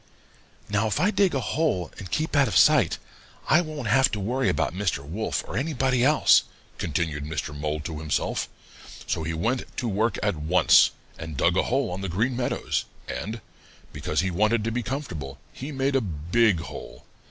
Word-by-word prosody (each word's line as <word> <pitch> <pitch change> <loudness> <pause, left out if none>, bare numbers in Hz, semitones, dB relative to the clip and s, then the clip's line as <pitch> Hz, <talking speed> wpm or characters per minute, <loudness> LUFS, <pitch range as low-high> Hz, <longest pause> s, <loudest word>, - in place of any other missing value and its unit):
"'Now 105 +2 +1
if 100 - -1
I 195 +4 +3
dig 195 -7 +2
a - - +1
hole 130 - -1
and 95 - -8
keep 155 - -1
out 140 -2 +5
of 110 - +1
sight, - - +5 0.5
I 165 - +5
won't 155 -7 -5
have 130 +4 +4
to 105 - -1
worry 125 +7 0
about 75 +1 0
Mr. 90 -7 -2
Wolf 105 +8 -2
or - - -6
anybody 130 -2 +1
else,' 150 +3 +5 0.4
continued 80 -2 -2
Mr. 75 -1 -4
Mole 75 +1 -2
to 75 0 -5
himself. 75 -2 -1 0.6
So - - -1
he 80 +1 -3
went 120 +11 0 0.2
to 125 - -1
work 110 +1 0
at 105 -4 +1
once 80 +5 +5 0.3
and 80 -3 -6
dug 85 +5 +3
a - - +4
hole 135 -3 +1
on 90 +2 -4
the 95 - -3
Green 115 +9 0
Meadows, 120 0 -1 0.2
and, 110 +2 -5 0.5
because - - -1
he 95 0 -1
wanted 105 +5 +2
to 115 - -1
be 125 +2 -1
comfortable, 90 - -5 0.2
he 135 +4 -7
made 135 0 0
a 135 - +3
big 90 +2 +1
hole. - - -9
105 Hz, 185 wpm, -25 LUFS, 80-130 Hz, 0.6 s, out